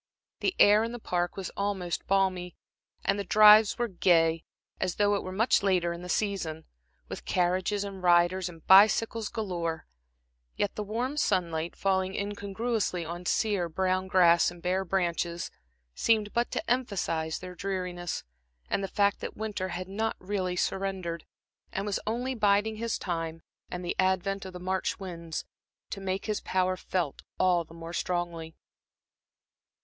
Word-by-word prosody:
The 380 - 0
air 210 +2 +6
in 230 +1 -3
the - - -4
Park 175 -5 -2
was 190 -2 -4
almost 195 -4 -2
balmy, 185 -2 +1 0.5
and 200 - +2
the - - -1
drives 210 +2 +7
were 240 - 0
gay, 165 -4 +3 0.4
as 185 -2 -1
though 205 0 +3
it 200 - 0
were 185 - -6
much 220 +6 +3
later 180 -3 +2
in 170 - -8
the 180 - -8
season, 175 -7 -1 0.4
with - - -7
carriages 185 +3 +1
and 195 -2 -7
riders 175 +1 +3
and 165 -2 -14
bicycles 215 +3 +5
galore; 175 -7 -3 0.7
yet 205 - -1
the - - -4
warm 235 +7 -2
sunlight 170 - 0
falling 190 -1 0
incongruously 200 -2 -2
on 175 +2 -6
sere, 200 -6 +1
brown 185 +2 0
grass 175 -2 +5
and 175 -1 -12
bare 185 +2 +1
branches, 175 -2 -1 0.4
seemed 215 - +1
but 235 +1 +1
to - - -4
emphasize 185 -10 -1
their 180 0 -8
dreariness 180 -2 -3 0.5
and 195 - +1
the - - -1
fact 200 +1 +1
that - - -6
winter 210 -3 -3
had 180 +1 -5
not 220 +3 -2
really 185 -2 -2
surrendered, 185 -3 -2 0.5
and 195 - -3
was 205 -2 -1
only 245 +4 -1
biding 210 -1 +2
his 230 0 -1
time 165 -2 -4 0.3
and 180 0 -5
the 175 - -2
advent 190 +1 +1
of 190 - -8
the 180 - -7
March 185 +3 -2
winds, 170 -4 -5 0.5
to 195 - -5
make 190 0 -2
his 215 -1 -1
power 185 0 +1
felt 180 -5 -3 0.2
all 180 -2 +3
the 165 0 -15
more 165 0 -8
strongly. 170 -2 -3
185 Hz, 160 wpm, -29 LUFS, 175-205 Hz, 0.7 s, drives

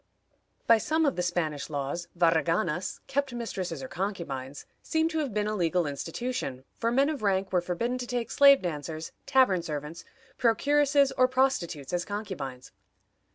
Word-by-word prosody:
By 230 -1 +6
some 315 +6 +1
of 280 - +1
the 180 - -1
Spanish 165 -5 -2
laws, 145 +4 -3
varraganas 165 0 +1
(kept 275 -1 -1
mistresses 185 - -4
or - - -5
concubines) 145 -9 -4 0.2
seem 320 0 +1
to 320 -1 -2
have 285 -5 -2
been 210 0 0
a 215 - -1
legal 175 -2 +1
institution, 145 - -4
for 230 0 -1
men 270 +3 +3
of 300 -5 -3
rank 195 -2 0
were 180 - +3
forbidden 230 +9 -2
to 245 - -5
take 240 -2 -2
slave 280 -3 +7
dancers, 160 -1 -4 0.2
tavern 260 -10 +4
servants, 150 0 -6 0.4
procuresses, 280 +3 +3
or 255 - +6
prostitutes 255 - 0
as 175 0 0
concubines. 140 -12 -6
190 Hz, 155 wpm, -28 LUFS, 165-255 Hz, 0.4 s, slave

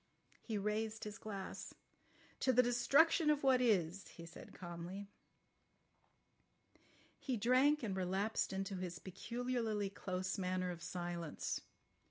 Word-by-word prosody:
He 220 -3 -3
raised 215 +2 -1
his 210 -1 -6
glass. 200 -3 -6 0.6
"To 260 - +3
the 250 0 +6
destruction 280 +7 +4
of 295 -1 +3
what 260 -2 +5
is," 195 -6 +2
he 170 - -10
said 170 - -11
calmly. 180 +3 -7 2.1
He 255 -4 -1
drank 255 +6 +4
and 200 -4 -1
relapsed 190 +4 0
into 195 0 -2
his 180 -2 -4
peculiarly 220 +2 -2
close 185 0 -3
manner 185 -1 0
of 170 -1 -7
silence. 175 -2 -3
200 Hz, 120 wpm, -38 LUFS, 185-240 Hz, 2.1 s, the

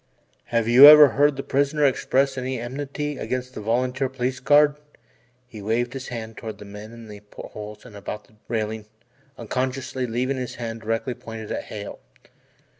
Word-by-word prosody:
"Have 115 -1 0
you 125 +4 +10
ever 150 -1 +10
heard 145 +1 +3
the 135 - -5
prisoner 145 +2 +1
express 135 0 +1
any 130 -1 -3
enmity 140 +4 -4
against 125 0 -4
this 105 - -7
volunteer 125 +4 0
Police 125 0 -3
Guard?" 145 +2 +4 0.7
He 110 -4 -10
waved 120 +4 -1
his 135 -1 -6
hand 115 -2 -7
toward 110 -2 -7
the 105 - -11
men 105 +3 -10
at - - -12
the 105 -1 -10
portholes 105 +1 -10
and 115 -4 -13
about 100 +1 -6
the - - -26
railing 110 -1 -3 0.5
unconsciously 130 +2 -3
leaving 125 +4 -1
his 125 -2 -5
hand 115 -2 -6
directly 115 +3 -2
pointed 115 -3 -9
at - - -3
Hale. 105 -1 -8
125 Hz, 170 wpm, -24 LUFS, 110-135 Hz, 0.7 s, you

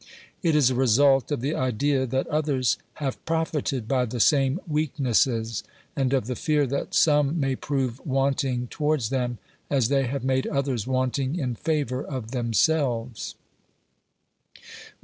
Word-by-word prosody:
It 165 -4 +2
is 135 -4 +4
a - - +1
result 135 +3 +3
of 145 - -1
the 140 +4 -1
idea 130 +1 0
that 130 +2 -1
others 145 -5 0 0.2
have 140 -4 -4
profited 155 -7 -1
by 125 0 +1
the 120 +1 -5
same 135 +4 +3
weaknesses, 130 -7 0 0.3
and 135 -2 0
of 135 -5 +1
the 125 +1 -3
fear 150 +2 +1
that 140 +2 -3
some 150 +1 +3
may 135 -2 0
prove 130 -3 -2
wanting 135 -2 0
towards 150 -3 -1
them, 125 -3 -1 0.3
as 130 -5 +2
they 135 -2 +2
have 135 +1 -3
made 130 0 +1
others 135 -6 -1
wanting 130 +2 0
in 130 -8 -2
favour 140 -1 -1
of 125 -5 -6
themselves. 120 - 0
135 Hz, 145 wpm, -25 LUFS, 125-145 Hz, 0.3 s, is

